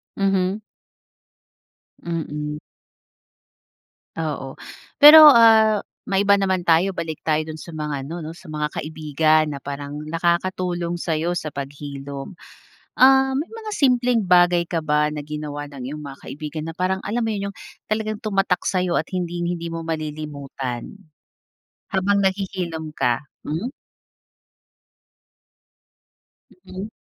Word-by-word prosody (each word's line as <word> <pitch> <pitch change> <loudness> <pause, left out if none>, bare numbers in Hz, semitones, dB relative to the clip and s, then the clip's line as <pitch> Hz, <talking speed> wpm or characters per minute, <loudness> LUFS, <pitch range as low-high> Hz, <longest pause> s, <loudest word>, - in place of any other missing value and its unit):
Mhm. 195 +1 0 1.4
Mm. 150 -3 -4 1.6
Oo, 145 -4 -4 0.4
pero, 305 +1 +11
ah, 220 -3 +6 0.2
maiba 200 +1 +3
naman 190 -3 0
tayo. 170 +4 +4
Balik 165 -4 -5
tayo 155 0 0
dun 155 - -6
sa 170 - -10
mga 150 -3 -4
ano 165 +5 -6
'no 160 -1 -6
sa 160 - -12
mga 150 0 -1
kaibigan 155 0 +1
na 140 - -6
parang 145 +1 -6
nakakatulong 175 +1 -1
sayo 165 0 -1
sa 160 - -4
paghilom. 140 +2 -7 0.7
Ah, 265 +1 +6
may 285 +5 -2
mga 450 -1 -8
simpleng 250 - +2
bagay 175 -1 +4
ka 165 -2 -2
ba 150 0 +2
na 150 -1 -5
ginawa 150 -1 -5
ng 130 -2 -7
iyong 150 +2 -6
mga 140 -1 -9
kaibigan 155 +1 -6
na 165 - -6
parang 185 +1 0
alam 235 +3 -1
mo 225 - -1
'yun, 200 -1 -3
yung 200 - -10 0.3
talagang 215 0 -2
tumatak 195 -4 0
sa'yo 185 -2 0
at 160 - -8
hinding-hindi 175 -2 -3
mo 165 - -4
malilimutan, 145 -5 -5 1.0
habang 195 +1 +2
naghihilom 185 -5 -2
ka? 120 -1 +1 0.2
Hmm. 175 - -3 2.9
Mm. 195 +4 -7
170 Hz, 120 wpm, -22 LUFS, 150-195 Hz, 2.9 s, pero